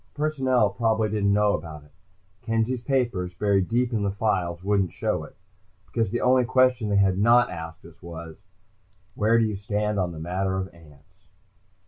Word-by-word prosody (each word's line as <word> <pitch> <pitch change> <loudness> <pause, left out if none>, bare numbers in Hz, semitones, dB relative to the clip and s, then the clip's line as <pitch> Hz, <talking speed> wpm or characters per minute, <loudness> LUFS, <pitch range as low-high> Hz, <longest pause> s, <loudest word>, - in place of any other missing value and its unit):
Personnel 130 -8 +1
probably 110 -1 +1
didn't 100 -1 +1
know 105 0 +3
about 80 -3 -6
it. 75 - -22 0.5
Kenzie's 115 +2 -1
papers, 120 -9 -1
buried 100 -1 +1
deep 120 +1 0
in 110 - 0
the 100 - 0
files, 90 -4 -1
wouldn't 100 -3 +1
show 105 -5 -2
it; - - -16 0.5
because 115 -2 -1
about - - -8
the 120 - -1
only 130 0 +4
question 125 -3 +2
they 100 - +1
had 95 -1 +3
not 120 +2 +4
asked 80 0 -8
us 85 -1 -16
was, 85 -2 -9 0.8
"Where 110 +2 +2
do 115 - +3
you 105 -1 -2
stand 105 +1 -2
on 90 -2 -1
the 85 - -9
matter 95 +3 -2
of 95 0 -4
ants?" 85 +4 -21
100 Hz, 180 wpm, -25 LUFS, 90-115 Hz, 0.8 s, only